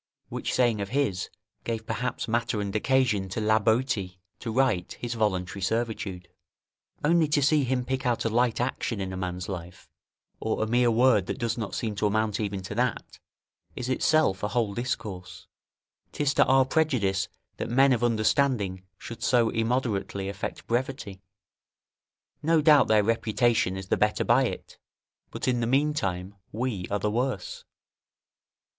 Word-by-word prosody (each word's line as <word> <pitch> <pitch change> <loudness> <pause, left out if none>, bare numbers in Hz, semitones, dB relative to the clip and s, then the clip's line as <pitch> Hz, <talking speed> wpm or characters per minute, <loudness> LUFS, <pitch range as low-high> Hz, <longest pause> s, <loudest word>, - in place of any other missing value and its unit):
Which - - -3
saying 120 -4 +2
of 100 - -4
his 105 -8 -1 0.3
gave 115 -1 -3
perhaps 115 +2 -3
matter 115 -1 0
and 100 0 -3
occasion 110 -5 +1
to 95 - -3
La 110 0 +3
Boetie 110 -4 0 0.2
to 115 - -4
write 110 -7 +1
his 120 -1 -5
"Voluntary 100 -4 -1
Servitude." 100 -3 -2 0.8
Only 165 +1 +4
to 150 0 +2
see 150 +1 +4
him 125 0 -1
pick 130 0 -2
out 120 -3 0
a - - +2
light 120 +1 +1
action 120 -3 -2
in 95 -1 -3
a - - -4
man's 90 0 -4
life, 90 -2 -7 0.5
or 110 - -1
a - - +1
mere 120 +2 +3
word 115 -4 +3
that - - -3
does 115 -1 -1
not 105 -5 -4
seem 110 -3 -2
to 105 - +2
amount 110 0 0
even 100 -3 -3
to 95 - -6
that, 125 +4 -2 0.6
is 125 0 -4
itself 130 -6 +2
a 105 - 0
whole 110 -2 0
discourse. 105 -6 -5 0.7
'Tis 145 -1 0
to - - +4
our 135 0 +4
prejudice 120 -10 +1 0.3
that - - -4
men 135 +3 +5
of 120 -1 -1
understanding 110 -4 +1 0.2
should 115 - -9
so 120 -2 +3
immoderately 115 -4 -1
affect 100 +1 -5
brevity; 120 -5 -3 1.2
no 165 +1 +3
doubt 150 -2 +6
their 105 -1 +4
reputation 115 -2 +1
is 95 0 -8
the - - +2
better 105 0 +1
by 125 +3 +4
it, - - -6 0.5
but - - -5
in 125 -1 +2
the 115 - 0
meantime 115 -10 0 0.2
we 110 -5 -3
are 105 - 0
the 105 +1 -1
worse. 120 -3 -2
115 Hz, 165 wpm, -27 LUFS, 100-125 Hz, 1.2 s, doubt